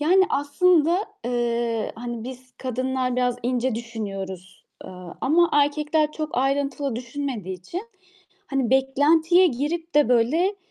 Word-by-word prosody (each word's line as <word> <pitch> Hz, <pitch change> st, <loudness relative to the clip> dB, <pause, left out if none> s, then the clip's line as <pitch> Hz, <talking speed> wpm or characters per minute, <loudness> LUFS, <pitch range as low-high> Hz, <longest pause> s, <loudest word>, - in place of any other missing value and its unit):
Yani 370 Hz, +6 st, +5 dB
aslında, 330 Hz, +4 st, +3 dB, 0.3 s
eee, 235 Hz, -2 st, -1 dB
hani 240 Hz, -1 st, -6 dB
biz 255 Hz, 0 st, -9 dB
kadınlar 255 Hz, 0 st, -2 dB
biraz 250 Hz, -1 st, +1 dB
ince 250 Hz, 0 st, 0 dB
düşünüyoruz, 195 Hz, -5 st, -6 dB, 0.2 s
eee, -, -, -9 dB, 0.3 s
ama 340 Hz, +5 st, +3 dB
erkekler 300 Hz, +1 st, +2 dB
çok 310 Hz, 0 st, -4 dB
ayrıntılı 275 Hz, -1 st, 0 dB
düşünmediği 240 Hz, -7 st, -4 dB
için 340 Hz, -, -6 dB, 0.6 s
hani 270 Hz, -6 st, -1 dB
beklentiye 310 Hz, +7 st, +4 dB
girip 320 Hz, +4 st, -3 dB
de 295 Hz, -5 st, +4 dB
böyle, 310 Hz, -, +2 dB
265 Hz, 120 wpm, -24 LUFS, 240-305 Hz, 0.6 s, Yani